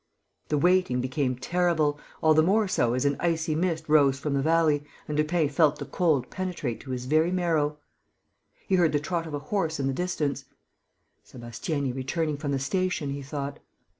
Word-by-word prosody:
The 150 - +1
waiting 180 -5 +3
became 130 0 -1
terrible, 155 +1 +1 0.2
all 155 0 +6
the 155 - +5
more 205 +6 +3
so 120 -9 +1
as 130 - 0
an 140 -1 +1
icy 165 -2 0
mist 160 -1 -1
rose 145 -3 +4
from 140 +1 -3
the 140 - +1
valley 155 -1 +2 0.2
and 150 - -3
Lupin 155 +1 +1
felt 150 +1 +3
the - - -6
cold 155 -9 0
penetrate 175 -11 -3
to 135 - -12
his 125 -1 -3
very 155 +5 +3
marrow. 165 -5 0 0.9
He 190 - +3
heard 165 -4 +3
the 145 - +3
trot 165 +2 -3
of 150 - -4
a 145 +6 -7
horse 165 -7 0
in 135 - 0
the 135 - 0
distance: 145 -4 -2 0.8
"Sébastiani 130 +3 -4
returning 150 +3 -2
from 145 -1 -3
the 140 - +1
station," 170 +1 -1
he 140 0 -4
thought. 140 0 -5
150 Hz, 185 wpm, -27 LUFS, 140-170 Hz, 0.9 s, all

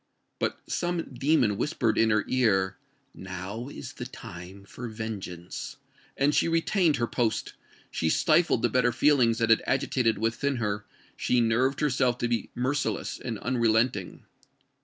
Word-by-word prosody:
But - - -1
some 175 -5 -2
demon 125 -5 +2
whispered 115 -5 0
in 115 - +3
her 105 -1 +2
ear, 95 -7 +2 0.4
"Now 95 +6 -6
is - - -8
the - - -6
time 90 +3 -10
for 120 +4 -8
vengeance!"—and 110 - -5
she - - +3
retained 165 0 +2
her 120 - 0
post—she 110 -8 -3
stifled 160 - +3
the 120 - +3
better 125 +1 +2
feelings 120 -3 +3
that 115 -1 +2
had 115 - +5
agitated 125 -4 +1
within 115 +6 0
her—she 105 +2 -2
nerved 120 +5 +2
herself 130 -4 +2
to 120 - -1
be 120 -1 -1
merciless 135 +4 -1
and 115 -3 -4
unrelenting. 115 -4 0
120 Hz, 135 wpm, -27 LUFS, 105-135 Hz, 0.4 s, had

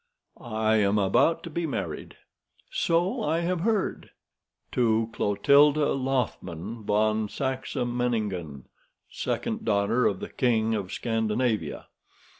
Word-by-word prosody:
"I 110 -1 0
am 100 0 +2
about 105 - +2
to 170 - -7
be 170 +1 -2
married." 95 - -5 0.5
"So 170 +3 +1
I 160 +3 0
have 175 +1 -1
heard." 210 +2 -1 0.6
"To 115 -2 +1
Clotilde 140 +9 +4
Lothman 120 - -2
von 110 +1 +1
Saxe 130 +3 -3
Meiningen, 110 - -2 0.5
second - - -3
daughter 105 +3 +2
of 95 - -1
the - - -6
King 115 -3 +1
of 100 -3 -3
Scandinavia. 110 - -1
115 Hz, 110 wpm, -27 LUFS, 105-135 Hz, 0.6 s, Clotilde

